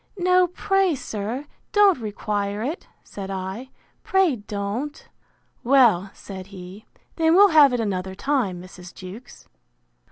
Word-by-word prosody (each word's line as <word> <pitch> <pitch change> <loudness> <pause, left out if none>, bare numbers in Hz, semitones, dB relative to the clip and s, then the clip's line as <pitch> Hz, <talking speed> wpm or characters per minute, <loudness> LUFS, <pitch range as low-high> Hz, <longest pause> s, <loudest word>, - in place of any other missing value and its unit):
No, 365 0 +3
pray, 390 -1 +1
sir, 225 +3 -5 0.3
don't 405 -6 +5
require 205 -1 -3
it, 300 +8 -4 0.2
said 195 -1 -8
I, 195 +6 -5 0.3
pray 380 -9 +2
don't. 210 +7 -5 0.6
Well, 235 -8 +4
said 190 -2 -9
he, 190 +1 -11 0.3
then 325 0 +3
we'll 400 +2 +7
have 300 -5 +7
it 245 - -1
another 190 -3 -3
time, 235 -7 -1
Mrs. 180 0 -12
Jewkes. 195 +6 -11
225 Hz, 125 wpm, -23 LUFS, 195-300 Hz, 0.6 s, we'll